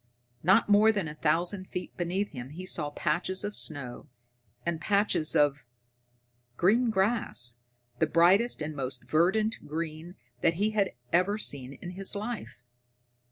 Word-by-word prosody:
Not 190 +7 +4
more 210 +2 +6
than 200 -6 -2
a 150 - -6
thousand 170 +5 0
feet 180 -1 -6
beneath 185 +4 -2
him 125 -3 -7
he 175 +6 -8
saw 150 -5 0
patches 185 +5 -1
of 205 0 -4
snow, 140 -2 -1 0.6
and 170 -1 -2
patches 200 -5 +1
of 145 -1 +3 0.9
green 230 +7 +3
grass, 190 - 0 0.4
the 160 - +3
brightest 175 +5 +4
and 155 0 -5
most 130 -3 -4
verdant 190 +9 +2
green 160 +3 -5 0.3
that 165 0 +3
he 205 +5 +1
had 205 -3 0 0.2
ever 185 +4 +3
seen 140 -10 -2
in 175 +6 -8
his 195 +2 -2
life. 215 - -5
175 Hz, 145 wpm, -29 LUFS, 155-205 Hz, 0.9 s, more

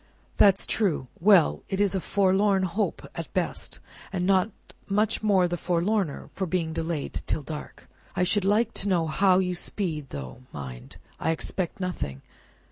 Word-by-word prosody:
"That's 195 -1 +5
true. 170 - 0
Well! 190 -2 +5
It 195 -1 -2
is 205 -2 +3
a 190 - 0
forlorn 195 +1 +2
hope 185 +4 -2
at - - -4
the - - -29
best, - - -2 0.3
and 180 -2 -1
not 190 +1 +3 0.4
much 210 +2 +2
the 185 -5 +2
forlorner 180 0 -1
for 190 - -2
being 165 -2 -1
delayed 160 -2 -3
till 150 - -1
dark. 150 0 -8 0.3
I 180 - +2
should 200 +2 +3
like 210 +4 +2
to 200 - -1
know 175 -3 +2
how 185 +4 +3
you 180 -1 +1
speed; 165 -6 -3
though, 65 - -7
mind! 65 -4 -8 0.2
I - - 0
expect 165 +3 -2
nothing! 125 - -4
185 Hz, 160 wpm, -26 LUFS, 160-200 Hz, 0.4 s, That's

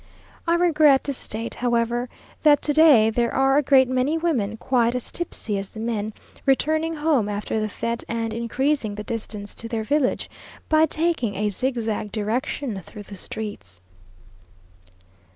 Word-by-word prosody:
I 335 - +4
regret 305 -6 +4
to 280 - -2
state, 225 -2 -5
however, 240 0 0 0.3
that 295 -2 +5
to 295 - +1
day 280 -8 +6
there 235 +1 +1
are 270 +1 +3
a - - +3
great 265 -2 +5
many 255 +5 +1
women 245 -11 -1
quite 240 0 +1
as 250 - -4
tipsy 225 -11 -3
as 195 0 -5
the 220 - -10
men, 220 -2 -2 0.3
returning 315 +4 +1
home 295 -8 +1
after 210 +1 -2
the 215 - -1
fête, 230 +2 -3
and 230 -1 -2
increasing 235 0 -1
the 210 - -5
distance 210 -2 -5
to 230 - -7
their 225 -1 -2
village, 285 +2 0 0.4
by 315 0 +5
taking 310 - 0
a 210 +1 0
zigzag 225 -2 -2
direction 220 +1 -2
through 210 - -10
the 200 - -10
streets.... 190 - -7
235 Hz, 155 wpm, -23 LUFS, 215-285 Hz, 0.4 s, day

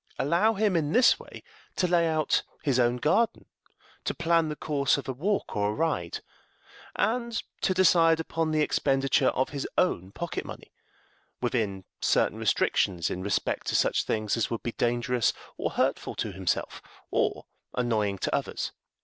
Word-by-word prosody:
Allow 175 +10 +2
him 205 -2 +1
in 155 -1 0
this 250 0 +5
way - - -12 0.3
to 180 - +1
lay 170 -1 +3
out 155 -1 +1 0.2
his 135 -3 +2
own 120 0 +3
garden, 215 - +1 0.6
to - - -1
plan 165 -1 +2
the 150 - -3
course 145 -3 +1
of 140 - -6
a 130 - -2
walk 195 +11 -1
or 105 0 +1
a - - -1
ride, 150 - -1 0.7
and 235 +1 0 0.2
to 185 - +1
decide 165 -3 +5
upon 160 0 -1
the 155 -1 +2
expenditure 135 -2 +2
of 130 - +1
his 140 -2 -3
own 95 - +1
pocket 170 +9 -4
money, - - -10 0.7
within 105 -6 -1 0.2
certain - - +2
restrictions 85 -3 +1
in 90 - -4
respect 100 0 -1
to - - 0
such - - +2
things 110 -2 0
as 115 - 0
would 115 - -4
be 120 - -2
dangerous 120 0 +1 0.2
or - - -2
hurtful - - -1
to 105 - -3
himself, 95 -1 -2 0.3
or - - 0 0.3
annoying 110 -5 0
to - - -2
others. - - -3
140 Hz, 165 wpm, -27 LUFS, 115-170 Hz, 0.7 s, this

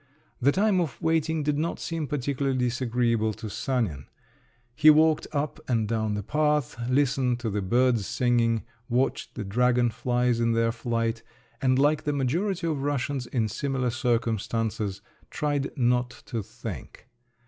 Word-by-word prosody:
The 140 +3 +5
time 195 +1 +2
of 160 -6 -4
waiting 160 -2 +1
did 145 0 0
not 165 +2 -2
seem 165 -3 -3
particularly 135 -1 -1
disagreeable 120 -3 +1
to 110 0 -7
Sanin; 105 - -2 0.7
he 150 +4 +6
walked 155 0 +5
up 145 0 -2
and 115 -3 +1
down 110 -1 -1
the 105 - -3
path, 150 +1 +1
listened 130 -2 +2
to 115 -3 -2
the 105 +1 -1
birds 120 +2 +2
singing, 115 -2 +1 0.3
watched 125 +3 0
the 115 - -4
dragonflies 120 +2 +1
in 115 0 +2
their 115 0 +2
flight, 115 -1 -2 0.4
and 130 -1 +3
like 145 +2 +3
the 150 - 0
majority 170 +8 0
of 155 -4 -1
Russians 140 -2 -1
in 115 -4 0
similar 130 +2 -1
circumstances, 115 -4 -1 0.3
tried 145 -2 -1
not 125 -1 +2 0.2
to 115 -3 -3
think. 105 +3 -9
125 Hz, 145 wpm, -26 LUFS, 115-145 Hz, 0.7 s, he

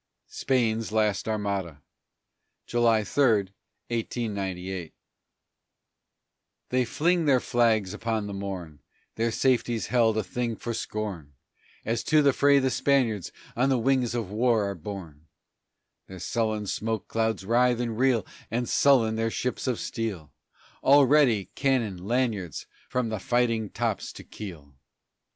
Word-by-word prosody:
SPAIN'S 115 -4 0
LAST 105 -2 +1
ARMADA 100 -7 -2 0.9
[July 115 -2 +2
3, 105 -5 +2 0.4
1898] 95 -7 -3 1.7
They 125 0 +2
fling 170 +7 +1
their 135 -3 +4
flags 110 -6 +1
upon 110 -1 -2
the 100 - -5
morn, 95 -6 -6 0.3
Their 115 +1 0
safety's 120 -2 +1
held 115 -3 +3
a 110 - +1
thing 120 +2 -3
for 120 +2 -5
scorn, 105 -10 -5 0.5
As 115 0 -1
to 155 -1 +4
the 140 -1 +4
fray 140 +1 +4
the 130 -1 +2
Spaniards 120 -10 +1 0.2
on 125 +3 +2
the 130 - +3
wings 125 -1 +1
of 110 -5 -3
war 110 -1 +2
are 100 - -2
borne; 85 -4 -9 0.8
Their 95 - -9
sullen 110 +2 -1
smoke 110 +2 -3
clouds 110 -3 -1
writhe 120 +2 +3
and 120 -2 -2
reel, 125 -2 +2 0.2
And 120 +2 -1
sullen 125 -6 +4
are - - -3
their 115 0 0
ships 125 +3 -3
of 125 -3 0
steel, 100 -10 -4 0.5
All 140 +1 +6
ready, 130 -8 +3
cannon, 115 -10 0
lanyards, 110 - -1 0.2
from 125 -2 -1
the 110 -2 -3
fighting 115 -1 +1
tops - - -2
to - - -10
keel. 80 -9 -10
115 Hz, 135 wpm, -27 LUFS, 100-125 Hz, 1.7 s, All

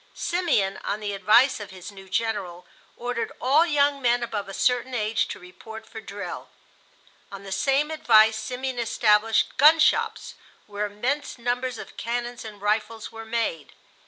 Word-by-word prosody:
Simeon, 310 - 0
on 210 - -2
the 205 -1 -4
advice 220 +7 +4
of 205 -2 -8
his 185 +1 -10
new 195 -1 -13
General, 185 -5 -2 0.3
ordered 245 0 -3
all 295 +7 +4
young 285 -2 +2
men 245 -1 +2
above 210 -4 -4
a - - -7
certain 250 0 +1
age 215 -1 0
to - - -6
report 220 +5 -11
for 220 - -9
drill. 200 -1 -7 0.8
On 195 0 -9
the 195 - -9
same 275 +10 +1
advice 220 -8 +5
Simeon 255 +1 -4
established 220 -1 +2
gun 300 +4 +7
shops, 310 - +1 0.3
where 210 0 -3
immense 255 +10 -3
numbers 245 +1 -2
of - - -10
cannons 240 +1 -4
and 210 -2 -10
rifles 215 +1 -1
were 225 0 -9
made. 220 -9 -3
225 Hz, 160 wpm, -25 LUFS, 205-250 Hz, 0.8 s, gun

